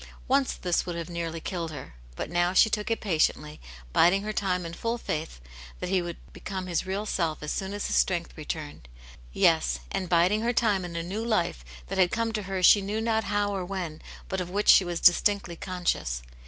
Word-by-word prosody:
Once 270 0 +2
this 175 -2 0
would 175 - -5
have 170 +1 -5
nearly 165 -1 -3
killed 170 -1 -4
her, 145 - -9 0.2
but - - -4
now 175 +2 +1
she 220 +3 +5
took 210 0 -1
it 225 - 0
patiently, 155 -4 0 0.3
biding 190 +4 +4
her 215 0 -3
time 180 -4 -1
in 165 - -6
full 230 +6 -2
faith 155 - -4 0.4
that - - -4
he 190 -1 +3
would 175 -1 -5 0.2
become 190 -2 -5
his 175 0 -2
real 195 +3 -2
self 165 -7 -1
as 150 - -3
soon 190 0 -3
as 205 0 -3
his - - -1
strength 175 -2 +1
returned. 150 - -6 0.4
Yes, - - +3
and 185 -2 -2
biding 180 +5 +3
her 240 +2 +1
time 210 -5 +2
in 175 -1 -6
a 165 - -2
new 200 +6 -4
life 175 - 0 0.2
that - - -4
had 180 -1 +5
come 230 +2 -1
to 215 - -1
her 190 -1 -2
she 200 +3 +8
knew 205 +3 -2
not 225 -1 0
how 205 0 0
or 190 - -2
when, 175 -4 -5 0.3
but 190 -1 -2
of 180 - -5
which 205 +3 0
she - - +8
was 175 -1 -3
distinctly 185 0 +3
conscious. 175 - -2
180 Hz, 215 wpm, -27 LUFS, 170-205 Hz, 0.4 s, she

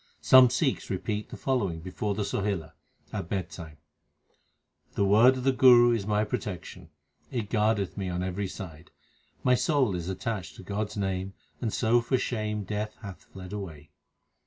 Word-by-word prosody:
Some 130 -1 +8
Sikhs 130 +2 0
repeat 105 +3 -3
the - - -8
following 100 -11 -1
before 95 +4 -3
the 105 - -1
Sohila, 100 -5 -2 0.4
at 85 - -4
bed 95 -4 -2
time: 80 -2 -9 1.2
The 100 - +2
word 115 +6 +6
of 130 - -5
the 135 - +4
Guru 120 -2 +7
is 110 -4 -1
my 105 0 +2
protection; 90 -4 -5 0.4
It 115 -6 -4
guardeth 105 -3 +1
me 95 -2 -2
on 90 0 -2
every 95 +2 -2
side. 85 -4 -9 0.5
My 125 - +4
soul 130 - +2
is 85 0 -4
attached 95 -3 -4
to - - -11
God 105 +3 -2
s 105 - -10
name, 95 -1 -2 0.3
And 115 -4 -1
so 120 +2 +3
for 130 +2 +1
shame 105 -4 -2
Death 105 +2 -4
hath 100 -3 -9
fled 95 0 -10
away. 80 -8 -7
105 Hz, 170 wpm, -28 LUFS, 95-115 Hz, 1.2 s, Some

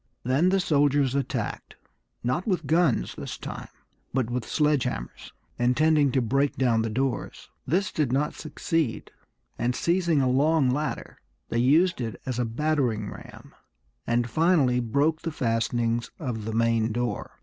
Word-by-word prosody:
Then 135 +9 +2
the 195 +1 +2
soldiers 145 -5 +2
attacked, 140 -1 -3 0.5
not 125 - -1
with 185 -4 0
guns 160 - +2
this - - -7
time, - - -7 0.5
but 125 -3 0
with 125 -1 -3
sledge 150 -4 +2
hammers, 90 - -5 0.3
intending 145 +3 +3
to 130 -3 +2
break 135 +4 +1
down 120 -4 +2
the 110 - -1
doors. 130 +3 -3 0.2
This 185 +7 +1
did 145 -6 0
not 140 +3 0
succeed, 155 -4 -2 0.5
and 125 +1 0
seizing 170 -1 +1
a 130 - +2
long 140 +1 +3
ladder 150 +2 -3 0.3
they 115 - 0
used 155 +6 +3
it 115 -2 -4
as 125 -2 -3
a 125 - +1
battering 125 -2 -1
ram, - - -12 0.5
and 120 0 +1
finally 150 -3 +3
broke 140 +7 +1
the 165 - -3
fastenings 115 -3 0
of 120 -8 -4
the 110 - -3
main 115 0 +2
door. 120 +2 -3
130 Hz, 150 wpm, -26 LUFS, 120-155 Hz, 0.5 s, intending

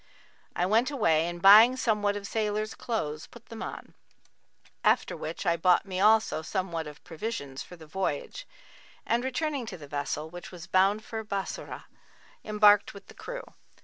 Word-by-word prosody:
I 175 - +1
went 225 +7 +2
away 165 - +2
and 175 0 -5
buying 220 +6 +8
somewhat 210 -4 +1
of 205 -1 -6
sailors' 215 0 -2
clothes, 155 -10 -4
put 235 -1 -16
them 225 - -8
on; - - -7 0.9
after - - +2
which - - -6
I 170 -1 +3
bought 180 +3 +3
me 185 -2 -4
also 215 -5 +3
somewhat 170 -2 -3
of 150 -1 -12
provisions 155 -7 -5
for 180 - -10
the 165 -2 -13
voyage; 190 - -4 0.6
and, 235 +1 +1
returning 270 -1 -2
to - - -6
the 145 -3 -11
vessel, 145 +2 -3
which 175 +2 -10
was 175 -2 -9
bound 195 +4 +2
for 225 -2 -5
Bassorah, 200 -2 -5 0.6
embarked 210 -1 +4
with 200 - -13
the - - -12
crew. - - -7
200 Hz, 165 wpm, -28 LUFS, 170-220 Hz, 0.9 s, buying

